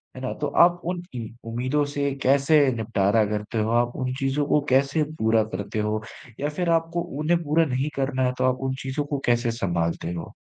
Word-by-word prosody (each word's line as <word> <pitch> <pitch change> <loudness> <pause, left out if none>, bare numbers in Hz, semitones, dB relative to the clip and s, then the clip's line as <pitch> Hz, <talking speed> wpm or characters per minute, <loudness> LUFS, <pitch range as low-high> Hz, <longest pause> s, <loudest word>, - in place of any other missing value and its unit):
है 130 - -8
ना? 130 - -3
तो 150 - -3
आप 175 +3 +4
उन 175 0 -3
उम, 115 -2 -4 0.2
उम्मीदों 130 +5 0
से 140 -1 0
कैसे 140 +3 +4 0.2
निपटारा 110 -1 +2
करते 105 +2 -3
हो? 110 +1 0
आप 120 +1 +1
उन 130 -1 -2
चीज़ों 135 +1 0
को 150 - +3
कैसे 140 +4 +3 0.2
पूरा 110 0 +3
करते 100 +3 -3
हो? 105 0 -1 0.4
या 145 - -1
फिर 175 +3 -2
आपको 165 +1 -4 0.2
उन्हें 170 +3 +2
पूरा 160 +2 +3
नहीं 135 +1 -1
करना 135 -1 0
है, 125 - +1
तो - - 0
आप - - -8
उन 130 - -2
चीज़ों 135 +2 -2
को 145 -1 -3
कैसे 120 0 +2
संभालते 85 -6 -2
हो? 85 - -7
130 Hz, 205 wpm, -24 LUFS, 110-150 Hz, 0.4 s, आप